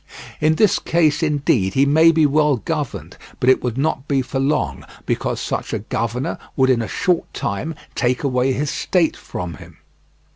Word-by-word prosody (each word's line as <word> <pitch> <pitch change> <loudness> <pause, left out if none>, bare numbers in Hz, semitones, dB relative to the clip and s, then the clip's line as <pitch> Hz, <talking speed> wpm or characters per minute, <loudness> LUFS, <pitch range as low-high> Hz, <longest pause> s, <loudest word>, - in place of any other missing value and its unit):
In 155 +1 +3
this 210 +2 +3
case 160 -3 +1
indeed 140 - +1
he 135 - +4
may 160 +4 +5
be 160 -1 +3
well 150 -1 +3
governed, 150 +2 -4 0.2
but 130 - +5
it - - +2
would 125 -1 -2
not 140 -1 -1
be 135 -2 +1
for 135 +1 -4
long, 135 - 0 0.2
because - - -1
such - - -3
a - - +1 0.2
governor 115 +3 -2 0.2
would 130 -1 +3
in 120 -2 +2
a 110 - -3
short 180 -3 0
time 155 +11 -3 0.2
take 125 +1 0
away 130 -1 +1
his 145 +3 -1
state 175 -4 +1
from 90 -2 -6
him. - - -14
140 Hz, 180 wpm, -20 LUFS, 125-155 Hz, 0.2 s, may